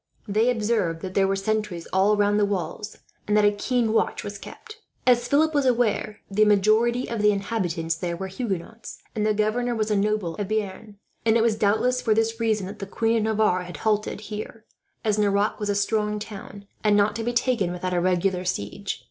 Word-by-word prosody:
They 215 +4 +2
observed 210 -8 0
that 185 -1 -6
there 195 0 +3
were 195 - +1
sentries 200 -3 -2
all 200 +3 +3
round 205 0 +3
the - - +3
walls, 205 +2 -4 0.3
and 210 0 +3
that 210 - +4
a 205 - +5
keen 225 +2 0
watch - - 0
was 205 -1 -6
kept. 435 - -11 0.3
As 245 -1 +4
Philip 310 +4 +3
was 285 -3 +2
aware, 230 -4 0
the 205 +2 +2
majority 215 +4 +3
of 230 -2 -3
the 210 0 +5
inhabitants 180 -6 -2
there 170 0 -3
were 190 - -4
Huguenots, 195 +1 -5 0.2
and 215 -1 0
the 215 - +2
governor 235 +3 0
was 215 -1 -1
a - - +3
nobleman 205 -3 0
of 200 - -2
Bearn; 210 0 -4 0.3
and 225 0 +4
it 225 - +3
was 230 -2 +2
doubtless 220 +5 +1
for 220 -2 +2
this 225 +1 0
reason 220 -4 +1
that 200 +3 -8
the 195 - -5
Queen 225 +3 +1
of 220 - 0
Navarre 215 -4 +2
had 175 -3 -8
halted 210 +1 -1
there, 215 +1 -7 0.4
as 215 -1 +1
Nerac 205 0 +1
was 210 -1 -2
a 205 - +1
strong 210 +1 0
town, 205 -1 -9 0.2
and 210 -1 +4
not 205 +1 +2
to 225 - -3
be 240 - 0
taken 235 -6 +1
without 180 +1 -3
a 175 - +1
regular 180 0 +1
siege. 180 - -3
210 Hz, 210 wpm, -24 LUFS, 195-225 Hz, 0.4 s, a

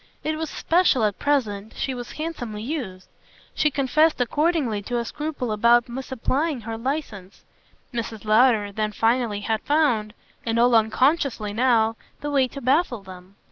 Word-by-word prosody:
It 310 0 -1
was 315 -1 -4
special 335 -8 +2
at 210 -2 0
present 220 -8 -1
she 265 - -2
was 245 -1 -7
handsomely 245 -10 -5
used; 230 - -5 0.5
she 305 - +2
confessed 300 +3 +2
accordingly 275 -4 +1
to 245 +4 -3
a 235 - -2
scruple 295 -6 -4
about 235 +3 +4
misapplying 265 +3 -2
her 225 +1 -5
licence. 230 -6 -5 0.5
Mrs. 225 -2 -5
Lowder 215 -1 +4
then 215 +1 -2
finally 225 -2 +1
had 220 +1 -1
found 240 -8 +1 0.3
and 230 0 -1
all 240 +1 +4
unconsciously 230 0 +2
now 225 -1 +2 0.2
the 290 - -3
way 270 -2 +3
to 275 +2 -9
baffle 260 - +1
them. 185 0 -13
240 Hz, 150 wpm, -24 LUFS, 215-285 Hz, 0.5 s, about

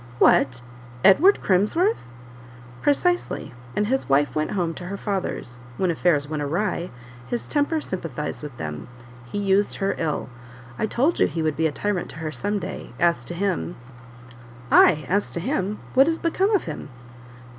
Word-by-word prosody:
"What! 125 -1 +4 0.4
Edward 355 - +6
Crimsworth?" 270 - +2 0.7
"Precisely; 350 - +1 0.2
and 210 - +1
his 265 - -1
wife 135 -1 +3
went 155 +2 -1
home 175 -4 -1
to 175 - -8
her 200 +3 -5
father's; 190 - -3 0.2
when 185 -2 +1
affairs 155 -3 +2
went 155 0 -3
awry, 170 +4 -1 0.4
his 240 - -3
temper 300 +2 +1
sympathized 165 - -4
with 145 -5 -8
them; 75 -2 -5 0.4
he - - -3
used 200 0 +2
her 195 0 0
ill; 160 -2 -1 0.5
I 220 - +1
told 275 +10 +1
you - - +5
he 165 - -3
would 155 -2 0
be 160 +2 +2
a - - -3
tyrant 195 +4 -2
to - - -8
her 155 0 -4
some 205 +5 -2
day; 180 - -6
as 170 -7 +2
to 175 - -5
him 185 -2 -1 0.5
" 120 0 -18
"Ay, 155 -4 +6
as 200 +4 +1
to - - -4
him 190 +4 -1 0.2
what 270 +2 +6
is 330 0 +1
become 370 +5 +1
of 390 - +1
him?" - - -6
180 Hz, 170 wpm, -24 LUFS, 150-210 Hz, 0.7 s, Edward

